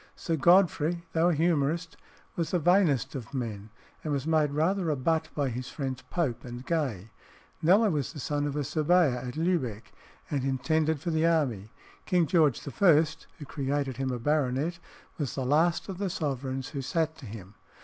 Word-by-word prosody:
Sir 165 - -2
Godfrey, 170 0 +3
though 165 +2 +3
a - - +2
humorist, 165 0 0 0.4
was 165 -3 -1
the 180 - +1
vainest 160 -7 +3
of 130 -1 -7
men, 110 -5 -4 0.3
and 155 - -3
was 140 -1 -1
made 155 -2 +2
rather 165 +4 +1
a 150 - +1
butt 160 +4 0
by 145 -3 0
his 125 +1 -5
friends 135 -3 -4
Pope 155 -10 -1
and 120 +1 -8
Gay. 125 - -2 0.5
Kneller 200 +6 +5
was 145 -5 -1
the 150 - -9
son 145 +2 -1
of 145 - -4
a 150 - -1
surveyor 155 -2 +2
at 125 +1 -6
Lübeck, 145 - -1 0.4
and 140 -3 0
intended 155 +3 +1
for 170 +4 -3
the 160 +1 +2
army. 130 -12 0 0.4
King 175 -2 +3
George 155 - +2
I., 160 +2 +5 0.3
who 145 - -8
created 140 -2 -2
him 135 0 -1
a 125 - -2
baronet, 145 +5 0 0.4
was 145 -4 -2
the 130 - -2
last 160 +6 +2
of 190 -2 -6
the 200 -2 -1
sovereigns 135 -6 -3
who 140 - -4
sat 160 +4 -1
to 130 - -9
him. 100 -2 -10
150 Hz, 180 wpm, -28 LUFS, 130-165 Hz, 0.5 s, Kneller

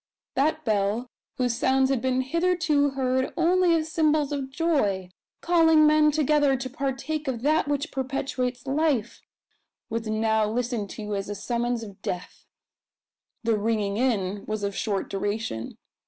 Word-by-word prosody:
That 310 +3 0
bell, 215 +3 0 0.3
whose 245 -2 +1
sounds 265 +2 +2
had 265 -4 0
been 260 0 +1
hitherto 330 0 +1
heard 260 0 +1
only 345 0 +4
as 320 -1 -1
symbols 305 -2 +2
of 275 -2 -3
joy 265 - 0 0.3
calling 325 -3 +5
men 305 0 +5
together 295 -2 +2
to 260 0 -5
partake 280 +2 -3
of 245 -3 -3
that 310 +1 +2
which 290 +2 -1
perpetuates 255 -1 -3
life 275 -5 0 0.7
was 225 0 -2
now 220 0 +1
listened 230 -3 -2
to 210 -1 -4
as 195 0 -4
a 205 - -3
summons 240 +1 -2
of 200 -3 -11
death! 180 - -6 1.0
The 230 -1 +2
"ringing 210 -2 0
in" 205 -5 0
was 215 -1 -3
of 200 -1 -2
short 200 -3 -1
duration. 205 - -3
260 Hz, 145 wpm, -26 LUFS, 220-300 Hz, 1.0 s, calling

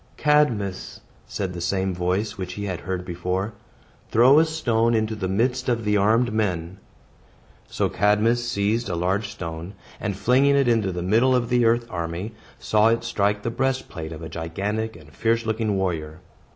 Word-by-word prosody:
"Cadmus," 125 -11 +1 0.3
said 95 -3 -3
the 85 - -6
same 95 +2 0
voice 90 +4 -1
which 90 -1 -5
he 100 - -5
had 90 -1 -4
before 90 +1 -2
heard, 105 - -5 0.6
"throw 130 +6 +6
a 160 - +4
stone 120 -8 +1
into 110 0 0
the 105 -4 -3
midst 125 +6 0
of 115 -2 0
the 105 0 +2
armed 110 +4 +3
men." 95 -4 -2 0.9
So - - 0
Cadmus 110 +4 +2
seized 105 +1 0
a 90 - -1
large 95 +5 0
stone, 85 0 -7 0.2
and 100 -2 -3
flinging 130 +7 +3
it 140 -2 +3
into 115 -5 +2
the 90 -1 -4
middle 115 +7 +3
of 120 -2 0
the 120 -1 +3
earth 115 +1 +3
army, 85 +4 -4 0.2
saw 110 0 +3
it 115 0 +2
strike 105 -2 0
the 115 - -2
breastplate 130 -11 -2
of 80 0 -8
a - - -5
gigantic 100 +7 -3
and 80 -2 -15
fierce 115 0 0
looking 110 -2 0
warrior. 80 -4 -3
105 Hz, 175 wpm, -24 LUFS, 90-115 Hz, 0.9 s, throw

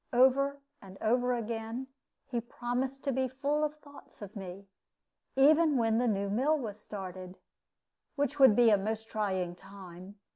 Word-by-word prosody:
Over 275 +3 +3 0.2
and 195 -1 -12
over 245 +3 +2
again 230 +2 -4 0.4
he 245 -4 -3
promised 250 +3 -3
to 275 - 0
be 260 0 0
full 285 +4 -1
of 300 0 -1
thoughts 290 -1 -16
of 205 +1 -10
me, 195 0 -8 0.7
even 300 +2 +5
when 225 -1 +2
the 245 - +1
new 200 -2 0
mill 265 +10 +2
was 215 -6 -6
started, 185 -2 -8 0.8
which 285 0 -1
would 265 -6 +8
be 235 -1 +6
a 205 - +4
most 220 +2 -4
trying 190 -5 -1
time. 190 0 -12
235 Hz, 155 wpm, -31 LUFS, 200-270 Hz, 0.8 s, would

